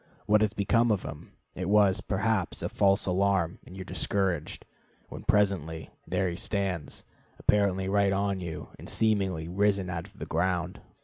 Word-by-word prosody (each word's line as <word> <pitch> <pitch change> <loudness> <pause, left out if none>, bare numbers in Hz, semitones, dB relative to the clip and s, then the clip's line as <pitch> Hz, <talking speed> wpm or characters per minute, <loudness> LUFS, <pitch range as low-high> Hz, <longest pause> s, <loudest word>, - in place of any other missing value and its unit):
What 105 0 +4
has 110 -1 +2
become 115 +3 +2
of 100 -3 0
him? 75 - -9 0.2
It 90 0 -4
was, 100 -2 +4
perhaps, 105 -1 -1
a - - -1
false 100 -1 +3
alarm, 95 -2 +1
and 90 - -12
you - - -6
are - - -7
discouraged; 95 -5 -1 0.4
when, - - -8
presently, 90 -6 +1 0.2
there 95 - 0
he 85 - -3
stands, 95 -8 -2 0.3
apparently 95 -2 +2
right 100 0 +3
on 100 0 0
you, 85 -3 -6
and - - -9
seemingly 95 -7 +1
risen 100 0 +1
out 85 +1 -4
of 100 +1 -22
the - - -5
ground. 90 +1 -1
95 Hz, 170 wpm, -28 LUFS, 90-100 Hz, 0.4 s, What